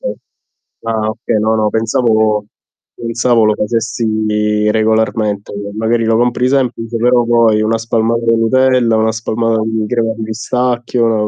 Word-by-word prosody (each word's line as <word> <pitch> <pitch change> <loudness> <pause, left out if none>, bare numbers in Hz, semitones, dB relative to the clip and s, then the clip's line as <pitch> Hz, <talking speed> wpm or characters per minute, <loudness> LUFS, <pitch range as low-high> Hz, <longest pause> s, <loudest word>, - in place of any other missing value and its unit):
Okay. - - -4 0.7
Ah, 110 -1 -1
okay, 110 -1 -2
no, 110 +1 +1
no, 110 -1 +1
pensavo 110 -2 +1 0.5
pensavo 115 -1 +1
lo 110 - +3
facessi 105 -1 -1
regolarmente. 110 -2 0 0.2
Magari 115 +1 0
lo 110 0 +2
compri 125 +1 +1
semplice, 120 -4 -1
però 120 +1 +3
poi 115 -2 +3
una 110 +1 +1
spalmata 115 +1 -1
di 115 0 +3
Nutella, 125 0 +2
una 110 0 +1
spalmata 115 0 -1
di 110 -1 -2
crema 115 -2 0
di 110 - -4
pistacchio, 120 -1 -1
115 Hz, 140 wpm, -14 LUFS, 110-120 Hz, 0.7 s, lo